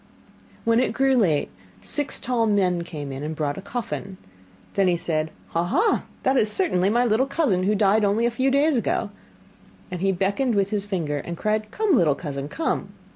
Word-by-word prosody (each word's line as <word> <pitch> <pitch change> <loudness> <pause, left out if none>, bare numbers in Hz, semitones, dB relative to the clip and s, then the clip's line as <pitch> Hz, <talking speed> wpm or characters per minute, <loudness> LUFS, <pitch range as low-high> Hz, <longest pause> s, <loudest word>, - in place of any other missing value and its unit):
When 230 0 +4
it 255 - +1
grew 270 0 +2
late, 170 - +2 0.3
six 290 0 0
tall 235 -2 0
men 185 -4 +2
came 145 -4 -7
in 135 +1 -6
and 155 +2 -4
brought 150 0 -2
a - - -7
coffin. 200 -3 -5 0.6
Then 195 -1 +2
he 175 -1 +2
said: 160 -2 -1 0.2
'Ha, 170 - 0
ha, 380 - +1 0.2
that 265 +1 +2
is 215 -3 +2
certainly 195 - +1
my 240 +3 +2
little 240 +4 +2
cousin, 275 - +1
who 205 +3 +1
died 210 +1 +3
only 205 +3 +2
a 240 - +2
few 260 +3 +1
days 285 +3 +3
ago,' 230 - -1 0.8
and 180 -1 -4
he 195 0 +2
beckoned 200 +7 0
with 200 0 +1
his 205 -1 -1
finger, 165 -7 -2
and 170 +2 -6
cried: 215 +1 -1
'Come, 420 - 0
little 165 - +4
cousin, 140 -4 -5
come. 325 - -2
205 Hz, 195 wpm, -24 LUFS, 175-245 Hz, 0.8 s, When